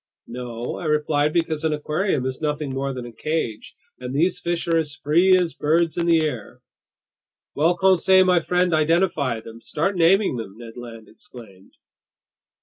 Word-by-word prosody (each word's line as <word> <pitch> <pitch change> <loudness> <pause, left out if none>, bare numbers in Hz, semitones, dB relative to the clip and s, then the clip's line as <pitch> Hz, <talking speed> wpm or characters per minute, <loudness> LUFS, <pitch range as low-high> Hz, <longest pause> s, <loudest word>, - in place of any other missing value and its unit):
"No," 120 -1 -6
I 175 - -7
replied, 150 -1 +1
"because 160 -2 -1
an 160 -1 +1
aquarium 150 -1 -1
is 130 +2 -4
nothing 150 -2 -2
more 135 +1 -2
than 125 -2 -6
a 120 - -9
cage, 115 -5 -4 0.2
and 125 +1 -6
these 170 +6 +1
fish 170 0 -3
are 165 -1 +2
as 150 -2 -4
free 175 +5 +3
as 175 -3 -1
birds 165 +2 +1
in 170 -1 -1
the 165 -2 +3
air!" 125 -9 -6 0.9
"Well, 165 +4 +1
Conseil 190 +1 +4
my 180 -1 +4
friend, 180 +2 0
identify 155 -6 +1
them! 115 +1 -12
Start 165 - -2
naming 180 -3 +3
them!" 110 -3 -8
Ned 115 -1 -11
Land 115 -3 -10
exclaimed. 115 - -15
155 Hz, 165 wpm, -22 LUFS, 125-170 Hz, 0.9 s, Conseil